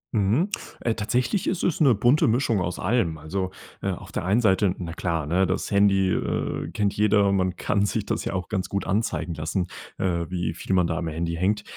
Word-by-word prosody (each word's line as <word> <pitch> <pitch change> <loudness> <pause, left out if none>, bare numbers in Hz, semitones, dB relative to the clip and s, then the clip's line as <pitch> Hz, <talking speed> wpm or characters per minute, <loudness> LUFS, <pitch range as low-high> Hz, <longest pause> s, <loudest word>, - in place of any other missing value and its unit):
Mhm. 110 - +2 0.3
Äh, 115 - +1
tatsächlich 125 - 0
ist 185 - -1
es 170 -2 0
'ne 135 -6 +6
bunte 125 +9 +4
Mischung 115 -3 +2
aus 90 0 -2
allem. 95 -6 +1
Also, 95 +5 -3 0.3
äh, - - -1
auf - - -6
der - - -3
einen 105 +6 +3
Seite, 95 -3 +3
na 85 -2 -5
klar, 85 -3 -2
ne, 90 +5 +2
das 95 - -2
Handy, 100 -2 +4
äh, 80 - -2
kennt 100 +3 0
jeder. 105 -1 +3
Man 95 -2 +1
kann 100 +2 0
sich 105 0 -2
das - - -2
ja - - -3
auch 90 -2 -3
ganz 95 -4 -2
gut 100 -2 -2
anzeigen 100 -4 -1
lassen, 85 +4 -2 0.3
äh, 85 -3 -1
wie 90 -2 -2
viel 90 - -3
man 90 -2 +4
da 80 -1 -1
am 85 -1 -3
Handy 85 +1 -2
hängt. 100 +5 0
95 Hz, 215 wpm, -25 LUFS, 90-105 Hz, 0.3 s, ne